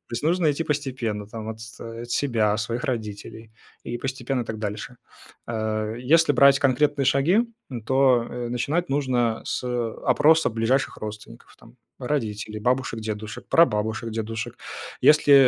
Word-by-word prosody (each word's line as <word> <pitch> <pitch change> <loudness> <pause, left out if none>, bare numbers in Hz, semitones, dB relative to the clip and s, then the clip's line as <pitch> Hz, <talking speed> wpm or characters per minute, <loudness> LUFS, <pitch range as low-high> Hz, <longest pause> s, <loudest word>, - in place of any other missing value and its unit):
То - - -16
есть 120 - -3
нужно 165 0 +3
идти 165 - -2
постепенно, 130 -8 -2
там, 110 0 -7
от 110 0 -6
с 115 +1 -10 0.3
себя, 115 -5 +1
своих 115 +3 -3
родителей, 110 -2 -5 0.3
и 120 +1 -4
постепенно 130 -1 -2
так 110 -1 -5
дальше. 105 +3 -5 0.5
Э, 110 -1 -2
если 150 +4 +4
брать 140 +1 +6
конкретные 140 +1 +2
шаги, 145 +11 +4 0.5
то, 130 -3 +4
э, 120 -1 -4
начинать 140 +9 -1
нужно 125 -5 0
с, - - -3
э, 120 -2 -2
опроса 155 +5 +4
ближайших 115 +4 0
родственников 105 0 -9
там: - - -18 0.2
родителей, 110 -5 -3
бабушек, 125 0 0
дедушек, 110 0 -6
прабабушек, 110 -6 +2
дедушек. 110 0 -4 0.4
Если, 150 -1 +6
120 Hz, 140 wpm, -24 LUFS, 110-135 Hz, 0.5 s, брать